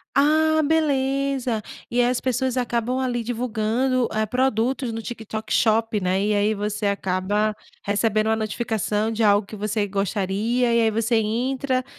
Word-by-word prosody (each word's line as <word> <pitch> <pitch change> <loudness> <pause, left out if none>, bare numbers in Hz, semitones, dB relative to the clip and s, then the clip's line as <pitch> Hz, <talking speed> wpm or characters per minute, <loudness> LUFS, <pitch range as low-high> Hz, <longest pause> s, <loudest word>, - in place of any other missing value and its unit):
Ah, 315 +2 +4
beleza, 275 -6 0 0.3
e 245 - 0
aí 240 - +3
as 250 - -1
pessoas 260 0 -1
acabam, 245 0 -1
ali, 245 -2 -1
divulgando, 240 +2 0
eh, 215 0 0
produtos 250 +1 0
no 225 - -4
TikTok 220 -1 -6
Shop, 225 -1 +2
né, 185 +1 0
e 210 0 +1
aí 205 +1 +2
você 210 0 -2
acaba 200 +2 0 0.3
recebendo 215 +1 +1
uma 220 - +3
notificação 220 -1 -1
de 225 +1 -1
algo 205 -1 +4
que 215 - -10
você 210 0 -1
gostaria, 205 +5 0
e 235 - +4
aí 225 -1 +3
você 225 +2 0
entra, 255 +4 -1
225 Hz, 155 wpm, -23 LUFS, 210-255 Hz, 0.3 s, Ah